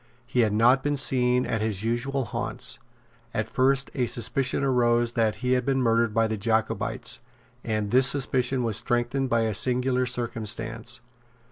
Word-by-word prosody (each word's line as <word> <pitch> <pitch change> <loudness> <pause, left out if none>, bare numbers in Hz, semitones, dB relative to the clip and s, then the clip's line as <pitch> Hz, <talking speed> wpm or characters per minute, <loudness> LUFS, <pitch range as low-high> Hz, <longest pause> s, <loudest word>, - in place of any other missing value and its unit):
He 125 - -2
had 110 -3 +3
not 120 +5 +4
been 145 +1 -1
seen 125 -1 +2
at 115 -2 -2
his 105 -2 -2
usual 125 +4 -1
haunts. 105 - -3 0.6
At 110 -1 -1
first 130 +3 +1
a 125 -4 0
suspicion 125 +4 -1
arose 120 -3 +2
that 115 -2 +1
he 125 - +1
had 125 0 +2
been 135 +1 0
murdered 115 -2 +2
by 115 +1 +2
the 110 0 -2
Jacobites; 110 +1 0 0.4
and 110 -2 -2
this 130 +1 +5
suspicion 130 -1 0
was 110 -3 0
strengthened 120 +3 0
by 115 -1 +2
a 110 -1 0
singular 125 +3 +1
circumstance. 115 0 -2
120 Hz, 160 wpm, -26 LUFS, 115-130 Hz, 0.6 s, this